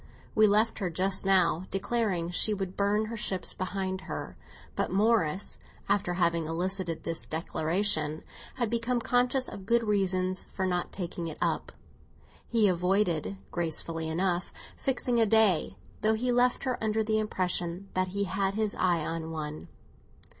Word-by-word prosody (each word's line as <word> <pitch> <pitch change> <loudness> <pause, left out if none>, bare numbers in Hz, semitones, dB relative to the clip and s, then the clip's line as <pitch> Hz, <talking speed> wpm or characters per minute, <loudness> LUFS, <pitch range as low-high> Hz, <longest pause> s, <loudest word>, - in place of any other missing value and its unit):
We 215 0 +6
left 215 +2 +2
her 190 -4 -1
just 190 +3 0
now 185 -2 +3
declaring 195 -3 0
that 175 - -6
she 215 +3 +4
would 190 -2 -4
burn 205 +2 +2
her 230 +2 -5
ships 190 -4 -1
behind 190 0 -3
her; - - -5 0.4
but - - 0
Morris, 200 -3 +1 0.3
after 195 -3 +1
having 170 -2 +1
elicited 175 0 -2
this 165 0 -3
declaration, 160 0 0 0.3
had 240 -4 -1
become 235 +1 +1
conscious 250 +2 +2
of 195 -1 -9
good 235 0 +3
reasons 185 -3 0
for 190 - -3
not 180 -1 -1
taking 175 -2 -4
it 160 - -6
up. - - -1 0.8
He 225 -3 +3
avoided, 180 0 +1
gracefully 165 -1 -2
enough, 175 +1 0 0.2
fixing 250 -3 0
a 225 - +4
day, 200 - +3 0.2
though 220 +1 +3
he 245 +3 0
left 245 +1 +2
her 255 -4 -2
under 220 0 +1
the 215 0 +1
impression 180 -3 -1
that 185 0 +1
he 200 +2 -1
had 195 +1 -1
his 215 -1 0
eye 175 -4 +1
on 165 -1 -3
one. 155 -1 -5
190 Hz, 155 wpm, -29 LUFS, 175-215 Hz, 0.8 s, We